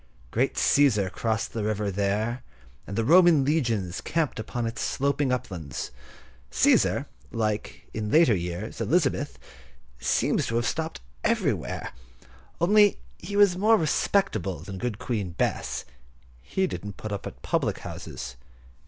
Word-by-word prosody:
Great 130 +4 +1
Cæsar 105 -10 +3
crossed 110 +4 -2
the 110 - -2
river 105 -1 -1
there, 105 +5 -1 0.5
and 100 - -5
the 115 - +2
Roman 170 -2 +6
legions 115 - 0
camped 160 -8 -1
upon 115 +2 -3
its 115 - -4
sloping 140 0 0
uplands. 90 - -4 0.6
Cæsar, - - +3 0.3
like, 110 -2 -2
in 105 -1 -3
later 155 -2 +5
years, 90 +5 -4
Elizabeth, 145 - +1 0.6
seems 65 - +1
to 115 - -2
have 120 0 +1
stopped 160 - -2 0.2
everywhere: - - 0 0.7
only 205 +4 +5 0.2
he 200 - -6
was 200 -3 +5
more 215 +4 +4
respectable 165 - 0
than 95 -2 -7
good 120 -2 -2
Queen 105 -7 -3
Bess; - - -1 0.6
he 190 - 0
didn't 100 - -6
put 110 - -6
up 100 - -4
at - - -7
the - - -27
public - - 0
houses. 65 0 -7
115 Hz, 135 wpm, -26 LUFS, 100-155 Hz, 0.7 s, Roman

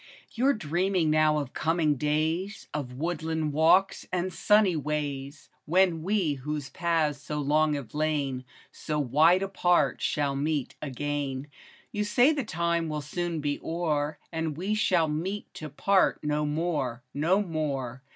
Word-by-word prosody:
OU 255 - +3
'RE 280 - +5
dreaming 175 - 0
now 155 0 +3
of 140 -4 -4
coming 160 -2 +1
days, 160 - -1
Of 140 -4 -4
woodland 160 +1 -2
walks 175 +6 +3
and 185 0 -1
sunny 210 -4 +4
ways, 145 -2 -4 0.2
When 175 0 +3
we, 185 -3 +1
whose 145 +1 -5
paths 160 -4 0
so 150 0 -4
long 150 +1 +2
have 140 -5 -7
lain 145 -4 -1 0.3
So 150 - -4
wide 155 +7 +4
apart, 180 -2 +1
shall 145 -3 0
meet 145 -1 -1
again; 145 0 -3 0.4
You 210 - -1
say 245 +8 +4
the 285 -3 -2
time 170 -4 -1
will 150 -1 -3
soon 170 +2 -3
be 145 0 -1
o'er. 155 -3 -1
And 160 -3 -3
we 190 +5 -1
shall 180 -6 +2
meet 180 +7 -4
to 155 - -7
part 190 +7 +2
no 150 0 0
more, 150 -6 -2
No 175 +8 +2
more 140 -7 -3
155 Hz, 150 wpm, -28 LUFS, 145-175 Hz, 0.4 s, RE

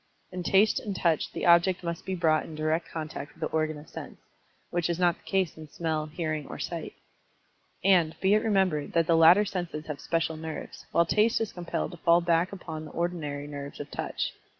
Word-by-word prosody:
In 180 0 -4
Taste 195 +4 +4
and 205 -3 -5
Touch 165 -4 +1
the - - -3
object 175 +1 +5
must 170 +1 -4
be 190 - -1
brought 160 -3 +2
in 160 - -9
direct 155 +2 -1
contact 155 -2 -6
with - - -20
the - - -2
organ 155 -1 0
of 150 +1 -12
sense, - - -9 0.5
which 175 -1 0
is 170 - 0
not 175 -1 +3
the - - -27
case 190 -4 +1
in 155 -1 -10
Smell, 155 0 -2
Hearing, 155 -2 -3
or - - -7
Sight. - - -5 0.9
And, 175 -4 +4
be 190 +1 +3
it 215 - +4
remembered, 190 -9 +1
that 165 -1 +3
the 165 0 +3
latter 170 +6 +7
senses 175 -5 -4
have 150 -2 -5
special 165 -1 -1
nerves, 160 0 -7
while 170 - +4
Taste 215 +6 +3
is 225 -2 -2
compelled 175 -1 -3
to 175 - -9
fall 170 +1 +4
back 170 +1 +2
upon 160 -5 -7
the - - -10
ordinary 160 -5 -2
nerves 140 -1 -7
of 145 - -7
Touch. - - -3
170 Hz, 210 wpm, -28 LUFS, 155-180 Hz, 0.9 s, latter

